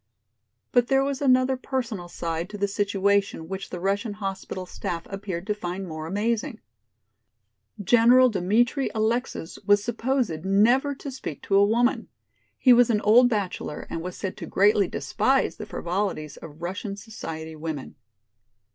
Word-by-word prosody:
But 245 -1 +3
there 270 0 +3
was 275 0 -2
another 255 -1 +4
personal 250 -8 -4
side 170 0 -4
to 210 - -7
the 200 0 0
situation 200 -3 0
which 190 +2 -6
the 180 - -6
Russian 200 +3 -1
hospital 195 -2 -5
staff 170 -2 -5
appeared 195 -3 -5
to 210 - 0
find 190 -1 -5
more 155 -1 -6
amazing. 225 - -1 1.2
General 240 +5 +6
Dmitri 225 +7 +1
Alexis 220 -5 -2
was 205 0 +4
supposed 235 - -1
never 240 +9 +3
to 275 +1 -7
speak 250 - -7
to 195 - 0
a 200 - +6
woman. 235 +4 +2 0.5
He 255 - +6
was 245 0 +5
an 210 -3 +2
old 240 +4 +6
bachelor 195 -8 -3
and 165 - -3
was 180 +1 -6
said 190 -2 -4
to - - -7
greatly 200 -1 +3
despise 260 +10 0
the 215 - -7
frivolities 175 -6 -3
of 160 +1 -11
Russian 195 +3 -4
society 160 -7 -7
women. 155 -3 -5
205 Hz, 150 wpm, -25 LUFS, 180-240 Hz, 1.2 s, General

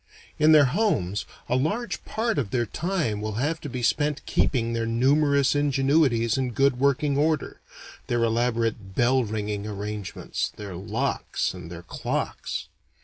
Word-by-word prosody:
In 155 +1 +6
their 150 -2 +8
homes 125 - 0 0.2
a 125 - +1
large 205 - -1
part 225 -7 -1
of 115 -8 -2
their 120 +2 0
time 155 - -2
will 110 0 -3
have 145 +9 -1
to 145 - -6
be 125 -1 -4
spent 145 +3 +1
keeping 115 -3 +1
their 115 0 -1
numerous 140 +4 +3
ingenuities 135 -4 +2
in 125 -2 -1
good 135 +1 +2
working 140 +1 +2
order 155 0 0 0.5
their 120 -1 +1
elaborate 115 -4 0
bell 125 +2 +3
ringing 105 -1 -3
arrangements, 105 -1 -4
their 100 -3 -7
locks 105 +5 -2
and 90 -2 -9
their 85 0 -8
clocks. - - -3
125 Hz, 145 wpm, -25 LUFS, 110-145 Hz, 0.5 s, their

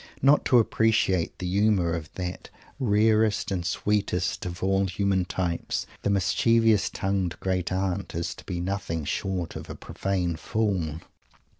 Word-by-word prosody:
Not 140 +2 +5
to 125 - +5
appreciate 110 -6 +2
the 90 - -5
humour 95 -2 +2
of 80 -2 -5
that 90 -1 -5 0.3
rarest 110 -3 +2
and 90 -3 -1
sweetest 90 -1 -1
of 85 +1 -6
all 95 0 +2
human 95 0 0
types, 90 -2 -2 0.2
the - - 0
mischievous 110 +3 +3
tongued 95 -3 -2
Great 95 -2 -1
Aunt, 95 -1 -2
is 85 0 -2
to - - -13
be 90 -2 -3
nothing 85 -4 -3
short 90 +2 -2
of - - -7
a - - -6
profane 90 -4 -2
fool. 90 -5 -1
95 Hz, 145 wpm, -26 LUFS, 90-105 Hz, 0.3 s, Not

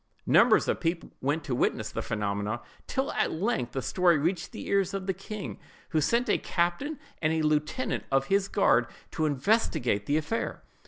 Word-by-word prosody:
Numbers - - +5
of - - 0
people 165 0 -2
went 145 +4 0
to 135 - -3
witness 120 - 0
the - - -3
phenomena, 105 +2 -2 0.3
till 265 +1 -1
at - - 0
length 165 - -1
the 135 - -2
story 180 -3 +3
reached 170 +5 -1
the - - -7
ears 195 -1 +1
of 195 -1 -3
the 190 - 0
king, 195 +2 -7 0.3
who 155 - +1
sent 235 - +2
a - - +2
captain 175 - -1 0.2
and 155 -1 +2
a 160 -1 +1
lieutenant 155 - 0
of 135 0 +3
his 195 +4 +2
guard - - +3 0.2
to 155 -1 0
investigate 145 - +1
the 145 - +2
affair. 160 +9 -2
165 Hz, 180 wpm, -28 LUFS, 140-195 Hz, 0.3 s, Numbers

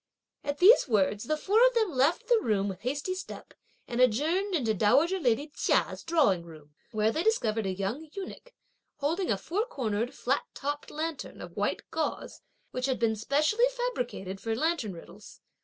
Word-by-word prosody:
At 285 0 -2
these 400 +5 +7
words, 210 -1 +1
the 310 +5 0
four 420 +9 +3
of - - -1
them 440 -5 +2
left 275 +5 +1
the 480 -2 +4
room 205 -3 +1
with 190 -2 -5
hasty 285 +9 -2
step, 370 - -8 0.3
and 245 0 -1
adjourned 320 - +2
into 235 -8 +1
dowager 290 - +3
lady 280 +1 0
Chia's - - +1
drawing 285 - +2
room, 155 -3 -14 0.2
where 215 -1 +2
they 315 - -1
discovered 225 - +1
a - - 0
young 200 +12 -4
eunuch, 395 +5 -8 0.4
holding 335 +6 -1
a 200 - +2
four 370 - -1
cornered, 235 - -2
flat 270 +1 0
topped 290 +1 -4
lantern, 315 -1 -5
of - - -9
white - - -1
gauze, - - -3 0.3
which 255 +1 -2
had 260 - 0
been 225 -1 +1
specially 305 - +2
fabricated 245 - -3
for 225 -1 -1
lantern 310 - 0
riddles. 165 - -13
275 Hz, 175 wpm, -29 LUFS, 215-340 Hz, 0.4 s, these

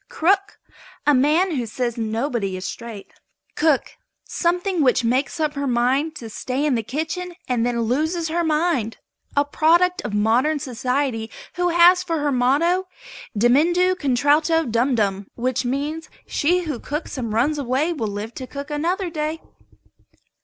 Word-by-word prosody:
CROOK. 390 +5 +1 0.5
A 295 - +5
man 305 +8 +3
who 240 -2 -2
says 235 +1 -2
nobody 225 -3 -2
is 185 - -6
straight. 230 -4 -8 0.4
COOK. 300 -4 +1 0.3
Something 355 +1 0
which 255 -2 +3
makes 255 +7 0
up 305 -1 0
her 280 -1 -2
mind 260 +6 +1
to 235 - -7
stay 255 +6 -3
in 295 - +2
the 230 - +1
kitchen 320 - -4
and 245 -2 0
then 235 -1 -1
loses 315 +9 0
her 340 +2 0
mind. 305 -8 0 0.4
A 285 - +4
product 345 +5 +3
of 210 - -5
modern 240 +9 +2
society 250 -3 -2 0.2
who 355 0 0
has 350 +1 +6
for 335 -3 -2
her 290 -1 0
motto 300 +9 +2 0.5
"Dimuendo 330 - +4
contralto 305 +1 +2
dumdum," 225 -5 0
which 255 +1 -1
means, 290 +6 -3 0.2
"She 355 +5 +1
who 300 -7 -4
cooks 300 +3 -5
and 230 -3 -3
runs 270 +8 +1
away 280 +6 0
will 230 -9 -3
live 205 +3 -5
to 255 - -7
cook 280 +2 -7
another 345 +5 -1
day." 310 0 -2
285 Hz, 155 wpm, -22 LUFS, 240-325 Hz, 0.5 s, has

